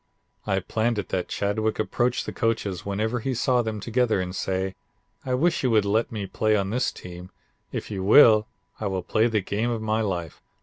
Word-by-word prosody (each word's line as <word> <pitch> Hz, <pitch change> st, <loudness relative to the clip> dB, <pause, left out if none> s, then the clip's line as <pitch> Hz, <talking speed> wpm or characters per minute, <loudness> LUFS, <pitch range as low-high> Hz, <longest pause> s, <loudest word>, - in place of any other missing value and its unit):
I 95 Hz, 0 st, +1 dB
planned 110 Hz, +4 st, -1 dB
it 105 Hz, -, -3 dB
that 90 Hz, -1 st, -1 dB
Chadwick 110 Hz, +2 st, -1 dB
approach 120 Hz, +3 st, 0 dB
the -, -, -6 dB
coaches 105 Hz, -5 st, -1 dB
whenever 110 Hz, +4 st, -1 dB
he 130 Hz, +3 st, -2 dB
saw 125 Hz, +1 st, +2 dB
them 110 Hz, -2 st, -3 dB
together 115 Hz, 0 st, +1 dB
and 90 Hz, 0 st, -3 dB
say: 95 Hz, 0 st, -2 dB, 0.5 s
'I 130 Hz, -, +1 dB
wish 165 Hz, +6 st, +2 dB
you 130 Hz, -, +1 dB
would 110 Hz, -3 st, +3 dB
let 110 Hz, +3 st, +1 dB
me 105 Hz, -3 st, -4 dB
play 110 Hz, +2 st, +1 dB
on 100 Hz, -1 st, 0 dB
this 125 Hz, +3 st, 0 dB
team. 90 Hz, 0 st, -10 dB, 0.4 s
If -, -, -5 dB
you 95 Hz, -2 st, -3 dB
will 110 Hz, 0 st, +7 dB, 0.3 s
I 110 Hz, -, -2 dB
will 95 Hz, -2 st, -2 dB
play 110 Hz, +5 st, +2 dB
the 110 Hz, -3 st, 0 dB
game 105 Hz, +5 st, -1 dB
of 115 Hz, -2 st, -1 dB
my 110 Hz, 0 st, 0 dB
life. 90 Hz, -6 st, -3 dB
110 Hz, 205 wpm, -25 LUFS, 95-115 Hz, 0.5 s, will